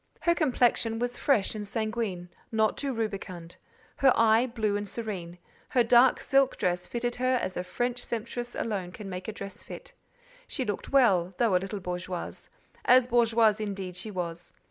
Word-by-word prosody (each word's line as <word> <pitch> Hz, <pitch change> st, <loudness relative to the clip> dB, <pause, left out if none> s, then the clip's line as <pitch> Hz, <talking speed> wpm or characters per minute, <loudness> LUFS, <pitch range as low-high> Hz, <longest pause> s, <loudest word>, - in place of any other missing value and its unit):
Her 340 Hz, -, +3 dB
complexion 245 Hz, -7 st, +2 dB
was 245 Hz, +1 st, -2 dB
fresh 230 Hz, -9 st, +2 dB
and 210 Hz, -1 st, -5 dB
sanguine, 215 Hz, -5 st, -3 dB, 0.2 s
not 220 Hz, -1 st, +2 dB
too 280 Hz, -1 st, -2 dB
rubicund; 195 Hz, -7 st, -5 dB, 0.4 s
her 270 Hz, -1 st, +5 dB
eye, 225 Hz, +2 st, +4 dB
blue 220 Hz, -4 st, -1 dB
and 205 Hz, 0 st, -3 dB
serene; 185 Hz, -7 st, -5 dB, 0.3 s
her 245 Hz, -, +3 dB
dark 240 Hz, +2 st, +5 dB
silk 275 Hz, -1 st, +2 dB
dress 180 Hz, -2 st, -1 dB
fitted 240 Hz, 0 st, -3 dB
her 255 Hz, +1 st, +2 dB
as 185 Hz, -, -3 dB
a 180 Hz, -, -2 dB
French 245 Hz, +6 st, -2 dB
sempstress 240 Hz, +1 st, -4 dB
alone 195 Hz, -5 st, -3 dB
can 200 Hz, -3 st, -8 dB
make 180 Hz, 0 st, -6 dB
a -, -, -2 dB
dress 200 Hz, -1 st, -8 dB
fit; -, -, -10 dB, 0.5 s
she 260 Hz, -, -3 dB
looked 205 Hz, -3 st, -4 dB
well, 195 Hz, -10 st, +4 dB
though 230 Hz, -6 st, +3 dB
a 180 Hz, -, +3 dB
little 195 Hz, +1 st, -4 dB
bourgeoise; 180 Hz, 0 st, -5 dB, 0.3 s
as 255 Hz, 0 st, +6 dB
bourgeoise, 230 Hz, -3 st, +3 dB
indeed, 195 Hz, -4 st, -4 dB
she 185 Hz, +4 st, -4 dB
was. 175 Hz, -3 st, -5 dB
220 Hz, 170 wpm, -28 LUFS, 185-245 Hz, 0.5 s, as